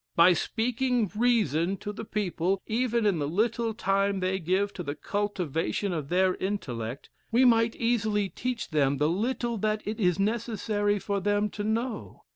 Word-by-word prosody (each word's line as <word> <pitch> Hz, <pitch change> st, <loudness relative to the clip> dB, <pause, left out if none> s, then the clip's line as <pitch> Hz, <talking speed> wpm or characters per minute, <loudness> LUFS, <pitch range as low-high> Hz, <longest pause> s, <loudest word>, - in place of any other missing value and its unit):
By 170 Hz, +2 st, +7 dB
speaking 240 Hz, +2 st, 0 dB
reason 195 Hz, -, +2 dB
to 205 Hz, +3 st, -6 dB
the -, -, -6 dB
people, 195 Hz, -2 st, -1 dB
even 235 Hz, 0 st, 0 dB
in 195 Hz, -6 st, +2 dB
the 145 Hz, -, -1 dB
little 225 Hz, +7 st, 0 dB
time 195 Hz, -1 st, +1 dB
they 185 Hz, +1 st, 0 dB
give 190 Hz, +4 st, 0 dB
to -, -, -6 dB
the 145 Hz, -3 st, -4 dB
cultivation 195 Hz, -1 st, -2 dB
of 150 Hz, -4 st, -4 dB
their 185 Hz, +1 st, +3 dB
intellect, 130 Hz, -, -4 dB, 0.2 s
we 245 Hz, +3 st, +5 dB
might 230 Hz, -1 st, +4 dB
easily 215 Hz, -3 st, +1 dB
teach 230 Hz, +3 st, -4 dB
them 140 Hz, -2 st, +2 dB
the 150 Hz, +2 st, +2 dB
little 235 Hz, +4 st, -1 dB
that 215 Hz, +1 st, 0 dB
it 215 Hz, +2 st, -4 dB
is 180 Hz, -4 st, +2 dB
necessary 210 Hz, -1 st, 0 dB
for 200 Hz, 0 st, -2 dB
them 205 Hz, +1 st, +1 dB
to 205 Hz, -, -5 dB
know. 225 Hz, +2 st, -3 dB
205 Hz, 165 wpm, -28 LUFS, 180-225 Hz, 0.2 s, By